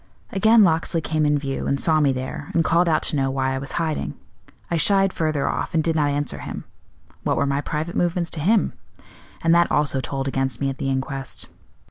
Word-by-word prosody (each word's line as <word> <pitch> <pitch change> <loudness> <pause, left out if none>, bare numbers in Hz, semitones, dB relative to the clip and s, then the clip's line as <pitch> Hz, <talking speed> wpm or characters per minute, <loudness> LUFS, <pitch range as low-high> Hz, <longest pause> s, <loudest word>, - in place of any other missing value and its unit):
Again 220 +1 +5
Locksley 165 -1 +2
came 155 -1 0
in 145 0 +3
view 140 -1 -3
and 140 - 0
saw 160 +1 +3
me 145 -2 +3
there, 130 +2 -5
and 165 - +4
called 170 +1 +3
out 155 - +2
to - - +1
know 135 -1 +1
why 130 0 -1
I 135 - -2
was 135 - -6
hiding. 155 - -2 0.6
I - - +2
shied 195 +3 +4
further 155 -3 0
off, - - -2
and 160 - +3
did 165 0 0
not 150 -2 +2
answer 145 -1 -2
him - - -6 0.6
what - - 0
were 140 - +2
my 140 0 0
private 155 +3 -4
movements 175 -1 0
to 160 - -5
him? 205 +8 +2 0.7
and 165 - +4
that 170 0 +4
also 140 -2 +1
told 135 0 -3
against 135 -3 -1
me 135 -1 0
at 135 - -9
the 135 - -1
inquest. 135 0 -3
150 Hz, 215 wpm, -22 LUFS, 135-165 Hz, 0.7 s, Again